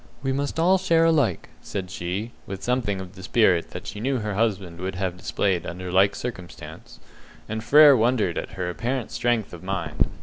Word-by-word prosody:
"We 135 - 0
must 140 +3 -2
all 185 +3 +4
share 165 -3 +3
alike," 155 -7 +1
said 95 -2 -5
she, 95 +6 -4 0.2
with 95 0 -6
something 120 -6 0
of 95 -1 -8
the 95 - -12
spirit 95 -3 +2
that - - -8
she 105 - -6
knew 130 +4 0
her 105 -3 -3
husband 95 -5 -1
would 95 +1 -4
have 90 -1 -2
displayed 90 -1 -1
under 90 +1 -6
like 100 +2 +4
circumstance; 100 -8 -8 0.5
and 110 0 -4
Frere 145 +4 +8
wondered 115 -7 +1
at - - -5
her 90 -2 -3
apparent 120 +7 -3
strength 120 -5 0
of 85 - -9
mind. 95 -5 -1
105 Hz, 190 wpm, -24 LUFS, 95-125 Hz, 0.5 s, Frere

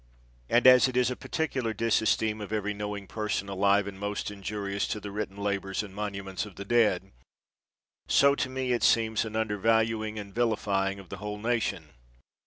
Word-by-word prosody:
And 120 +1 +3
as 130 0 +8
it 125 -1 -3
is 125 0 +3
a - - -2
particular 130 -9 -2
disesteem 110 0 +1
of 105 - -7
every 105 -1 -1
knowing 105 -1 -5
person 105 -1 -3
alive, 100 +1 +3
and 100 -1 -7
most 105 0 -3
injurious 100 0 -3
to 105 - -3
the 105 0 -7
written 100 -1 -4
labors 100 -1 -2
and 100 -2 -10
monuments 100 -2 -4
of 105 -3 -10
the 100 - -7
dead, 100 -5 +2 1.0
so 140 0 +5
to 135 -2 -1
me 130 -1 -2
it 120 - +1
seems 110 -1 +3
an 110 0 -6
undervaluing 110 0 +1
and 100 -2 -7
vilifying 100 -4 0
of 95 -3 -12
the 95 - -6
whole 105 +1 -5
nation. 105 -8 -1
105 Hz, 180 wpm, -28 LUFS, 100-115 Hz, 1.0 s, as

